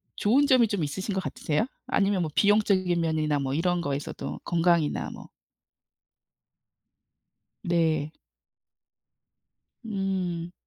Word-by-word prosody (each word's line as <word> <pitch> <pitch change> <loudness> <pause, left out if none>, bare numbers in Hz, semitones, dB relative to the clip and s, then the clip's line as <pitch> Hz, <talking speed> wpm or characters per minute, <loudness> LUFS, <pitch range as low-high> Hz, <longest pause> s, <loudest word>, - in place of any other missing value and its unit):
좋은 265 +8 +3
점이 250 -4 +5
좀 200 -5 -2
있으신 190 +8 -3
것 190 - -1
같으세요? 155 +8 -1 0.2
아니면 200 -5 +1
뭐 155 - -4
비용적인 200 -4 +3
면이나 155 -2 0
뭐 135 -1 -2
이런 175 +2 +1
거에서도 145 -1 -4
건강이나 170 -2 +1
뭐. - - -11 2.3
네. 160 -3 +1 1.7
음. 185 -4 -2
175 Hz, 215 characters per minute, -27 LUFS, 155-200 Hz, 2.3 s, 점이